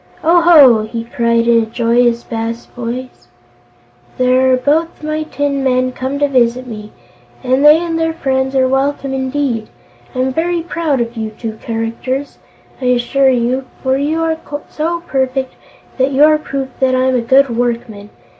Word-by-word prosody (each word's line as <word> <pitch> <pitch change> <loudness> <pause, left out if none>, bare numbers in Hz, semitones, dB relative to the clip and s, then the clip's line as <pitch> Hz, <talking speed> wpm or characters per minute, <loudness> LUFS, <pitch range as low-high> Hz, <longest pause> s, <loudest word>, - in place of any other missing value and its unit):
"Oh 340 +2 +4
ho!" 290 -10 +7
he 230 +1 -5
cried 235 0 0
in 230 -1 +4
a - - -2
joyous 235 +1 +1
bass 230 0 -4
voice; 245 - -7 0.9
"here 255 +1 +3
are - - +3
both 310 +5 -1
my 310 0 -2
tin 285 -3 -2
men 255 -1 +1
come 260 +2 -4
to 290 0 +2
visit 255 -2 +1
me, 215 -3 -9 0.5
and 260 +2 +1
they 300 +1 +8
and 330 -1 -2
their 325 0 +1
friends 265 -4 -1
are 260 -1 +3
welcome 270 +1 -1
indeed. 260 -4 -2 0.5
I'm 255 +1 0
very 335 +2 -1
proud 320 -6 -1
of 235 +1 -4
you 220 -1 -3
two 220 0 -7
characters, 230 +4 -4 0.4
I - - -3
assure 250 +2 +2
you, 255 +1 0 0.2
for 260 0 +1
you 305 +4 -1
are 320 0 0 0.3
so 335 +2 -2
perfect 265 -4 -2 0.5
that 260 +2 +2
you 275 +2 +4
are 305 0 +5
proof 275 -3 -4
that 260 -1 +2
I'm 260 0 +1
a 250 - +1
good 260 +1 +3
workman. 230 -4 -3
260 Hz, 165 wpm, -15 LUFS, 235-285 Hz, 0.9 s, they